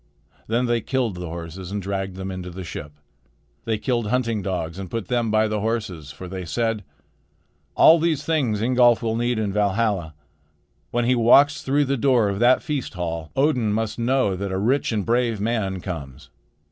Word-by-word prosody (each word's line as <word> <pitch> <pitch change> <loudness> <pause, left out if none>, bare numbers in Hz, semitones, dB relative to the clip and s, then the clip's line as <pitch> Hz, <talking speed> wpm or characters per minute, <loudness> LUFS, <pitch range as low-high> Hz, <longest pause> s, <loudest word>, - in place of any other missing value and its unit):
Then 120 +3 +1
they 120 -1 +1
killed 125 -3 -1
the 90 0 -6
horses 85 +2 -7
and 105 - -2
dragged 95 -1 -3
them 95 0 -5
into 90 -1 -6
the 95 +2 -7
ship. 75 -3 -7 0.7
They 110 -1 0
killed 120 0 -1
hunting 115 -2 0
dogs 90 -2 -3
and 95 -2 -6
put 115 -5 -4
them 120 -2 +1
by 110 0 +3
the 105 0 -1
horses; 105 -9 -3
for 90 +6 -9
they 95 0 -5
said: 115 +4 -1 0.9
"All 165 +1 +7
these 155 -3 0
things 125 -10 0
Ingolf 120 -1 +4
will 110 -1 0
need 120 0 0
in 105 -3 -1
Valhalla. 100 -5 0 0.7
When 120 0 0
he 125 - +3
walks 140 +5 +5
through 145 +2 +1
the 140 +1 0
door 120 -4 +3
of 100 0 -3
that 125 +2 +4
feast 140 -8 -3
hall, 85 -3 -4
Odin 130 -6 +2
must 110 +1 -2
know 120 -4 +1
that 100 +1 -4
a 95 - -1
rich 120 +9 +1
and 105 -3 -1
brave 120 -2 +1
man 100 -4 -1
comes. 70 -7 -7
110 Hz, 185 wpm, -23 LUFS, 95-120 Hz, 0.9 s, All